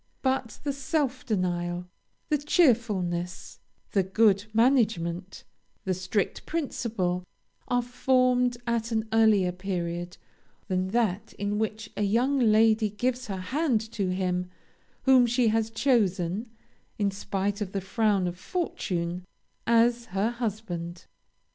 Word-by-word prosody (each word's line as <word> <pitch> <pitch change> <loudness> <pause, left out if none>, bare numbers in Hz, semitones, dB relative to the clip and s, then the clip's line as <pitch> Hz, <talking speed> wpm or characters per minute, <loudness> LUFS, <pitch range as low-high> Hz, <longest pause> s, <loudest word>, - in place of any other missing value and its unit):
But 260 -4 -1
the 285 -2 -1
self 275 -1 -1
denial, 175 -4 -1 0.4
the 300 -2 +2
cheerfulness, 210 - +1 0.3
the 195 - +3
good 200 +1 +3
management, 210 -7 +1 0.4
the 190 - 0
strict 185 +2 -2
principle, 220 - -2 0.4
are 245 0 +1
formed 250 0 +2
at 235 -1 -1
an 220 0 0
earlier 215 -5 +4
period 175 -2 -4 0.5
than 185 0 0
that 210 -2 0
in 205 +1 -2
which 220 0 -3
a - - -3
young 240 +7 +2
lady 220 -1 +4
gives 245 +4 -2
her 195 -2 -3 0.2
hand 290 -6 +2
to 200 -5 -1
him 180 -1 -1 0.5
whom 260 -2 +6
she 240 -1 +2
has 225 0 +1
chosen, 215 -4 +1 0.5
in 205 -2 +1
spite 200 +1 -2
of 195 -3 -3
the 195 - -1
frown 200 0 +1
of 175 +1 -5
fortune, 180 - -3 0.4
as 235 +1 +3
her 210 +1 0
husband. 190 -7 -4
215 Hz, 125 wpm, -27 LUFS, 185-240 Hz, 0.5 s, whom